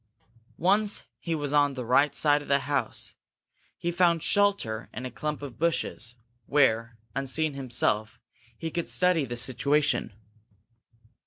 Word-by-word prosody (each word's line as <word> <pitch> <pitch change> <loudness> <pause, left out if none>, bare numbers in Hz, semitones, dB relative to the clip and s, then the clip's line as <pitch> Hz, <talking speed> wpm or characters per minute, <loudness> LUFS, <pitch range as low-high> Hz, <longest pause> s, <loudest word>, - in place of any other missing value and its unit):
Once 205 +4 +2 0.2
he 165 -2 -2
was 145 -2 -3
on 145 -2 +3
the 125 -2 -5
right 140 +5 +3
side 145 -1 +3
of 145 - -11
the 140 0 +3
house, 145 -1 -2 0.6
he 175 - -2
found 170 -2 +2
shelter 200 - +1
in 125 - -6
a 130 - -5
clump 150 +4 -4
of 135 -5 -8
bushes, 145 -7 -1 0.3
where, 115 -5 +2 0.2
unseen 140 +3 +1
himself, 120 -5 -1 0.4
he 165 - -4
could 170 +1 -3
study 180 -5 +2
the 120 -1 -5
situation. 140 +4 +1
145 Hz, 140 wpm, -27 LUFS, 125-165 Hz, 0.6 s, on